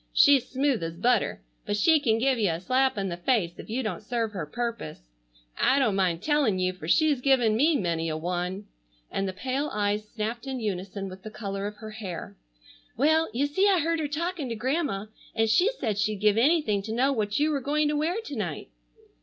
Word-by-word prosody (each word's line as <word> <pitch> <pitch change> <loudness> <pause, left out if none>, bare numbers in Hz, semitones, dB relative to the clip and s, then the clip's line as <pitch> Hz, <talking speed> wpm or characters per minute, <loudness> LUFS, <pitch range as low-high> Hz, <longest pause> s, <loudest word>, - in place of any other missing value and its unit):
She's 275 -3 +5
smooth 270 -4 +1
as 165 0 -4
butter, 230 - +1 0.2
but 205 - -2
she 315 +8 +5
can 230 -6 +2
give 255 +1 +1
you 205 -4 +2
a 165 0 -2
slap 260 +6 +1
in 195 -1 -1
the 170 - -4
face 175 -4 0
if - - -9
you 250 +4 -1
don't 215 - -3
serve 225 0 -2
her 180 -7 -5
purpose. 235 +5 -4 0.6
I 260 - +4
don't 240 -8 +2
mind 180 -3 0
telling 295 -10 +2
you 185 0 0
for 160 -4 -9
she's 295 - +3
given 245 -5 +3
me 300 +7 +3
many 165 - -1
a 155 - -2
one," 180 +4 -3 0.5
and 195 - -1
the - - -2
pale 265 +9 -2
eyes 210 0 -1
snapped 230 +4 -4
in 265 -1 -3
unison 195 -2 -4
with 190 0 -10
the 215 - -8
color 200 -2 -4
of 210 - -7
her 215 +1 -9
hair. 200 -6 -7 0.6
"Well, 315 +5 +3
you 250 +6 0
see 380 +8 +2
I 380 -3 +4
heard 330 +1 0
her 305 - -1
talking 320 -1 -3
to 230 - -3
Grandma, 255 -3 -1 0.3
and 225 0 +2
she 355 - +4
said 215 -6 -1
she'd 215 +1 +1
give 210 0 +3
anything 235 -5 +3
to 220 +3 -6
know 260 +5 +2
what 210 -4 -1
you 300 +2 +2
were 280 -2 -1
going 295 +3 +1
to 300 - 0
wear 315 +4 0
to 290 - -7
night." 175 - -4
225 Hz, 220 wpm, -27 LUFS, 195-280 Hz, 0.6 s, She's